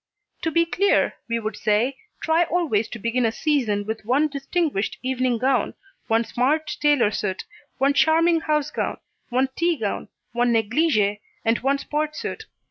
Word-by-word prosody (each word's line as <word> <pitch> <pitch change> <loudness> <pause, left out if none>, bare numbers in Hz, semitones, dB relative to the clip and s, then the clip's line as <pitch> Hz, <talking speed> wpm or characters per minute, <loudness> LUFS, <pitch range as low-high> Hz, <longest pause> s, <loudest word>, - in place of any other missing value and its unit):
To 325 - 0
be 335 +1 +3
clear, 395 +4 +2 0.2
we 230 - +1
would 215 -1 -4
say, 220 +7 +1 0.2
try 330 +2 +3
always 310 -12 0
to - - -7
begin 230 +3 0
a 225 - +2
season 230 -7 0
with 220 +1 -4
one 270 +7 +2
distinguished 280 - -1
evening 255 -1 0
gown, 260 +2 +1 0.3
one 225 +1 +2
smart 300 +7 0
tailor 290 -8 +4
suit, 195 -2 -3 0.3
one 275 +1 +3
charming 325 +3 +4
house 300 -2 0
gown, - - -2 0.3
one 260 +2 +1
tea 340 -1 +1
gown, 215 -4 -3 0.2
one 240 +1 +1
negligée 225 -2 +2 0.3
and 225 +1 +2
one 275 +2 +1
sport 300 +2 -2
suit. - - -5
260 Hz, 160 wpm, -23 LUFS, 225-305 Hz, 0.3 s, tailor